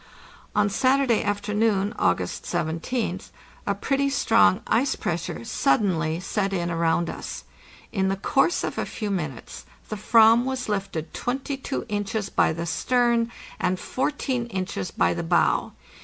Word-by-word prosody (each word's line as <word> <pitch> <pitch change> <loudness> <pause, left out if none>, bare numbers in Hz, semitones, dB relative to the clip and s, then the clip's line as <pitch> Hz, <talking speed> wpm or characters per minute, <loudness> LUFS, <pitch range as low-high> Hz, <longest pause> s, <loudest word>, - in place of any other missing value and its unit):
On 210 -1 +4
Saturday 255 +2 +2
afternoon, 205 0 0
August - - 0
17th, 180 +4 -2 0.4
a 200 - +1
pretty 275 +6 0
strong 225 -6 +4
ice 265 +4 +2
pressure 170 -8 -3
suddenly 165 - +1
set 195 +1 -1
in 175 -2 -1
around 165 0 +1
us. - - -6 0.5
In 190 -2 +1
the 195 - +1
course 270 - +1
of - - -3
a - - -1
few 210 -3 -4
min 155 -9 -2
utes - - -11 0.3
the 215 - -3
"vam 225 +2 +5
was 260 -1 -3
lifted 195 -6 -3
22 270 +2 -3
inches 205 0 -2
by - - +3
the 165 +1 -4
stern, 235 +6 +1 0.3
and 180 0 0
14 260 -3 -2
inches 185 - -3
by 85 - +1
the - - -3
bow. 80 - +2
205 Hz, 140 wpm, -25 LUFS, 175-240 Hz, 0.5 s, vam